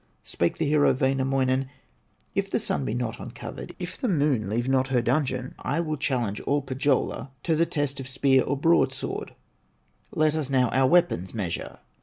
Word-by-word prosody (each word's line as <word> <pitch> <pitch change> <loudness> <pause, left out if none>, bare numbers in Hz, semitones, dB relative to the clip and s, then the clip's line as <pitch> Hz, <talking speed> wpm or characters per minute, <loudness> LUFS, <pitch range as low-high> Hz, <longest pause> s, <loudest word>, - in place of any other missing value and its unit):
Spake 85 - -1
the 160 - 0
hero, 150 0 +4
Wainamoinen: 130 0 +1 0.6
"If - - -1
the - - +1
Sun 70 - -1
be 110 - -2
not 120 -2 -3
uncovered, - - -8
If 180 - -6
the 255 - -1
Moon 140 - +1
leave 120 +4 -1
not 130 0 +2
her 125 -3 +1
dungeon, 130 -2 0
I 145 - -1
will 155 -2 -1
challenge 125 -7 -1
all 145 0 0
Pohyola 135 0 0
To 165 - +2
the 165 +2 +2
test 145 -4 -1
of 130 - -5
spear 135 0 +3
or 140 - -1
broadsword, 165 +5 +1 0.7
Let 155 0 +2
us 150 -4 -2
now 130 -3 +3
our 130 0 +3
weapons 150 - +2
measure!" 95 -6 -4
135 Hz, 175 wpm, -26 LUFS, 125-150 Hz, 0.7 s, hero